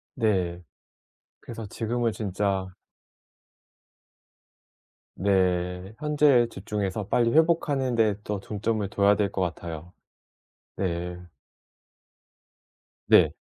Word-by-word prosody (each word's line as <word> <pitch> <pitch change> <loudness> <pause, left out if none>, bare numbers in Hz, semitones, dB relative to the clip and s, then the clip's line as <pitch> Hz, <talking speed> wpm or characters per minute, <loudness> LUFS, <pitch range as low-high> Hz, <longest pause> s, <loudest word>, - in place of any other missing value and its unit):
네. 95 -7 0 0.8
그래서 115 -2 -8
지금은 115 +2 -1
진짜 100 -2 -1 2.5
네. 90 0 0
현재에 145 -5 +4
집중해서 105 -2 -4
빨리 115 -1 +2
회복하는 150 -6 +2
데 110 -3 +3
더 105 -2 -3
중점을 105 0 -2
둬야 100 0 +3
될 100 -2 0
것 95 - -2
같아요. 85 0 -5 0.8
네. 90 -1 -3 1.9
네. - - +6
100 Hz, 165 characters per minute, -26 LUFS, 95-115 Hz, 2.5 s, 네